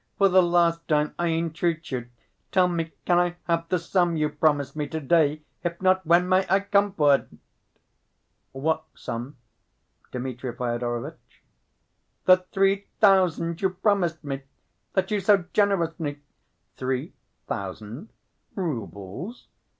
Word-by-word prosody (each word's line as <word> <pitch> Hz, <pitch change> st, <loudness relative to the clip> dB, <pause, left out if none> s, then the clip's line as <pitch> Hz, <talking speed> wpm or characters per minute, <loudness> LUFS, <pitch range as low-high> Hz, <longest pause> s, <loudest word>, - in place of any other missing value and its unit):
"For 195 Hz, -1 st, +5 dB
the 185 Hz, 0 st, +6 dB
last 170 Hz, -1 st, +2 dB
time 150 Hz, -1 st, +1 dB
I 175 Hz, -, +1 dB
entreat 165 Hz, 0 st, -1 dB
you, 125 Hz, -2 st, -4 dB, 0.4 s
tell 185 Hz, -2 st, +4 dB
me, 165 Hz, -2 st, -2 dB
can 175 Hz, -1 st, +4 dB
I 175 Hz, 0 st, +1 dB
have 165 Hz, -1 st, -1 dB
the 180 Hz, -, +2 dB
sum 175 Hz, 0 st, +1 dB
you 150 Hz, -1 st, +1 dB
promised 150 Hz, -2 st, +1 dB
me 150 Hz, -1 st, -2 dB
to‐day, 155 Hz, 0 st, +1 dB, 0.2 s
if 170 Hz, -1 st, -3 dB
not, 185 Hz, 0 st, +3 dB
when 175 Hz, +2 st, +5 dB
may 185 Hz, +1 st, +4 dB
I 195 Hz, +1 st, +4 dB
come 200 Hz, 0 st, +2 dB
for 145 Hz, -6 st, +4 dB
it?" 140 Hz, -, +1 dB, 1.2 s
"What 155 Hz, +4 st, -1 dB
sum, 120 Hz, +5 st, -6 dB, 0.7 s
Dmitri 125 Hz, 0 st, -5 dB
Fyodorovitch?" 120 Hz, -1 st, -4 dB, 0.8 s
"The 185 Hz, 0 st, +8 dB
three 195 Hz, +1 st, +2 dB
thousand 180 Hz, -5 st, +3 dB
you 190 Hz, -, +3 dB
promised 180 Hz, -4 st, 0 dB
me... 140 Hz, -1 st, -4 dB, 0.5 s
that 190 Hz, +1 st, 0 dB
you 210 Hz, -, +2 dB
so 195 Hz, -1 st, +3 dB
generously—" 165 Hz, -7 st, 0 dB, 0.6 s
"Three 130 Hz, +3 st, -2 dB, 0.3 s
thousand? 105 Hz, -, -6 dB, 0.5 s
Roubles? 140 Hz, -, -5 dB
165 Hz, 130 wpm, -25 LUFS, 145-185 Hz, 1.2 s, The